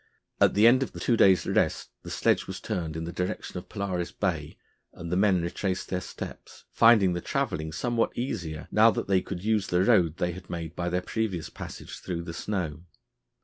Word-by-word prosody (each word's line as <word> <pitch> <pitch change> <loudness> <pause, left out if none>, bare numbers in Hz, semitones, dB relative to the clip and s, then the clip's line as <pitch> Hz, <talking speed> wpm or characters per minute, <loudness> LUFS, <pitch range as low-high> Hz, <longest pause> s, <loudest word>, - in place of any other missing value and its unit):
At - - +4
the 105 +2 +5
end 125 +3 +7
of 135 - -2
the - - -8
two 120 - +2
days' 95 -5 +5
rest - - 0
the - - -9
sledge - - +1
was - - -5
turned 80 -3 -3
in 80 - -3
the 85 +1 -5
direction 90 0 -3
of - - -15
Polaris 95 -4 -3
Bay 80 -7 -2 0.4
and 85 0 -7
the - - +1
men 95 -2 +3
retraced 95 +2 -2
their 90 -1 -1
steps, - - -9
finding 110 -6 +5
the 85 - -3
travelling 80 -1 -2
somewhat 115 +7 -1
easier 85 - -4
now 110 +2 +6
that - - -2
they 95 -2 +3
could 90 -1 -6
use 110 -2 +1
the 90 +1 +2
road 90 -8 +3
they 90 - 0
had 95 +2 -10
made 85 -2 -5
by 90 0 -2
their 90 +1 -1
previous 105 -7 -2
passage - - -8
through 85 -2 -4
the 85 -1 -6
snow. 85 -5 -3
90 Hz, 205 wpm, -27 LUFS, 85-105 Hz, 0.4 s, end